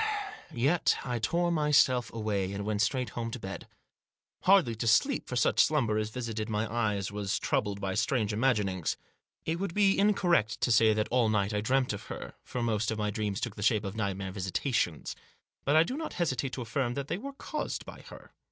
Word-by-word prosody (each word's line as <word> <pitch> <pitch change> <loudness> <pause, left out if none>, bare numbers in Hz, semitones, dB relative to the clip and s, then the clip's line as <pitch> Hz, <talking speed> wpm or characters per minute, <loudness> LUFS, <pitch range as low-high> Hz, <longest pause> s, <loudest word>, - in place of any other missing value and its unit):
Yet 140 +8 +2
I 125 -2 -2
tore 175 +9 +1
myself 145 -6 +3
away, 100 -4 -2
and 100 0 -4
went 105 -1 0
straight 125 +1 0
home 115 -1 -3
to 120 - -6
bed. 95 -2 -7 0.8
Hardly 185 -11 +5
to 115 - -2
sleep, 260 - +3
for 125 - -4
such 120 - +4
slumber 120 -9 +1
as 110 0 -2
visited 115 -2 -4
my 110 +1 0
eyes 105 -5 0
was 100 -2 -2
troubled 100 -1 -1
by 95 -1 -2
strange 110 +1 0
imaginings. 105 -7 0 0.5
It 165 +1 -1
would 195 -3 -3
be 200 -2 +4
incorrect 180 - +2
to 120 - +2
say 110 0 +5
that 105 0 0
all 120 -3 +3
night 105 -1 +1
I 105 - 0
dreamed 130 +2 +1
of 105 - -7
her, - - -7
for 125 - -4
most 110 -1 0
of 110 - -2
my 105 -1 -1
dreams 105 -1 -2
took 120 -5 -4
the 105 - -7
shape 110 0 +2
of 100 +1 -5
nightmare 100 -3 -2
visita 95 +7 -2
tions; 85 -10 0 0.5
but 145 - +3
I 160 - +7
do 250 - -4
not 315 +1 -4
hesitate 135 -6 -1
to 125 - -3
affirm 120 +2 -1
that 140 -1 -3
they 175 - -2
were 275 +4 -7
caused 300 +2 -4
by - - -10
her. - - -13
115 Hz, 205 wpm, -30 LUFS, 105-135 Hz, 0.8 s, I